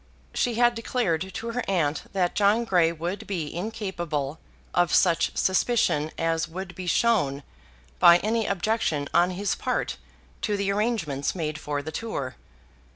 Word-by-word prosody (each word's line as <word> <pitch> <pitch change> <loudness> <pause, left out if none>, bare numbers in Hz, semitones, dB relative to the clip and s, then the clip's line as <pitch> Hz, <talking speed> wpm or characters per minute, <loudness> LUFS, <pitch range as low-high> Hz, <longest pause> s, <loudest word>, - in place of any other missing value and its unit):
She 240 -2 0
had 240 +1 +4
declared 190 -7 -1
to 230 +5 -4
her 245 +1 -2
aunt 160 -6 0
that 185 -3 0
John 210 +3 +3
Grey 175 -6 +3
would 170 +4 -5
be 170 -7 -3
incapable 175 -7 -3 0.3
of 175 -1 +2
such 170 -3 +3
suspicion 190 -6 +2
as 165 -1 0
would 180 +2 -7
be 180 +1 -7
shown 165 -10 +2 0.6
by 170 0 +8
any 220 +4 0
objection 195 -7 0
on 175 +1 +4
his 195 +2 -1
part - - -2 0.4
to 210 -2 0
the 200 0 0
arrangements 200 - -1
made 155 -3 -3
for 145 -1 -3
the 155 - -5
tour. 140 - -4
180 Hz, 150 wpm, -26 LUFS, 160-215 Hz, 0.6 s, by